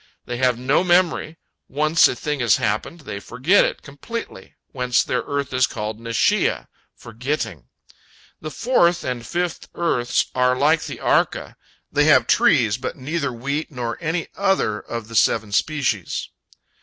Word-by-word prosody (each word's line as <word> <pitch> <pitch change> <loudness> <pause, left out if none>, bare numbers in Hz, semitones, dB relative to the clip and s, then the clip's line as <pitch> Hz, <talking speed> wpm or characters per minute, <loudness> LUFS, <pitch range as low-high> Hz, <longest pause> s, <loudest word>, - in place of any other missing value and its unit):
They 120 - -4
have 125 -1 +2
no 135 +7 +2
memory; 175 -3 +1 0.3
once 155 +3 +4
a - - -3
thing 150 +2 -3
has 120 -5 +4
happened, 110 +11 -2
they 110 -8 -6
forget 130 - +2
it - - -3
completely, 230 +12 -8 0.2
whence 125 -2 +1
their 125 - -1
earth 140 -2 -3
is 125 0 +3
called 105 +1 -5
Neshiah, 115 0 +1 0.3
"forgetting." 115 - -4 0.7
The 155 - -6
fourth 175 -4 +2
and 125 -2 -3
fifth 175 +7 -3
earths 125 -8 +1
are 125 0 +2
like 155 +5 +2
the - - -6
Arka; - - 0 0.4
they - - +3
have - - +5
trees, - - +3
but - - -5
neither 145 +1 -2
wheat 140 +7 -3
nor 120 -4 -4
any 165 +1 -2
other 190 - +1
of 115 -1 -6
the 115 - -9
seven 110 -1 +2
species. 125 - -1
130 Hz, 150 wpm, -21 LUFS, 120-160 Hz, 0.7 s, have